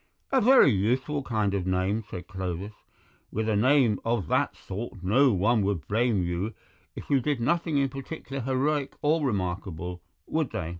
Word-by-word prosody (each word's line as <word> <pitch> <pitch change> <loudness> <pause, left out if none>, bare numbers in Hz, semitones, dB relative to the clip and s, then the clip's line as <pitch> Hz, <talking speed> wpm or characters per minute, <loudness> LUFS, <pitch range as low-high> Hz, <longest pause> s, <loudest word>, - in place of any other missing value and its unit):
"A 265 -2 +4
very 250 - +7
useful 125 +8 0
kind 110 -6 -1
of 95 -2 -1
name," 95 +4 0
said 90 -2 -7
Clovis; 95 +2 -5 0.6
"with 110 +1 -2
a 110 - +1
name 125 -1 +3
of 115 -7 -1
that - - +1
sort 100 0 -7
no 125 +8 +4
one 105 +3 +2
would 100 -5 -1
blame 110 -2 +1
you 90 +5 -3 0.4
if - - -8
you 140 - +5
did 145 -1 -1
nothing 160 +4 +1
in 140 -1 +3
particular 135 0 -6
heroic 135 +3 0
or 155 +1 +2
remarkable, 90 - -3 0.2
would 155 -3 -1
they? 80 -3 -4
110 Hz, 165 wpm, -27 LUFS, 95-135 Hz, 0.6 s, very